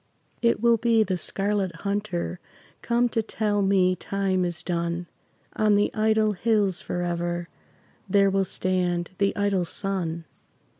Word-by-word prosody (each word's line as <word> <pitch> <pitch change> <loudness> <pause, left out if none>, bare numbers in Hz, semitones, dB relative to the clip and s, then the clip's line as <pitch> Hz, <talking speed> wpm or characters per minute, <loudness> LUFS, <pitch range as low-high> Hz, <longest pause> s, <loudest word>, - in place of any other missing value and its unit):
It 235 -1 +2
will 235 +1 +4
be 225 -1 +3
the 190 -3 -1
Scarlet 195 0 -1
Hunter 200 -3 -2 0.4
Come 240 +1 +2
to 225 - 0
tell 210 -1 -1
me 190 -2 +3
time 190 0 -1
is 175 0 -3
done; 170 0 -2 0.5
On 215 -1 +3
the 205 0 +2
idle 215 0 +2
hills 205 -2 +1
forever 175 -1 -3 0.6
There 195 0 +4
will 195 0 +2
stand 180 -1 -1
the 200 0 +2
idle 200 -3 +1
sun. 170 -2 -2
195 Hz, 135 wpm, -25 LUFS, 175-210 Hz, 0.6 s, will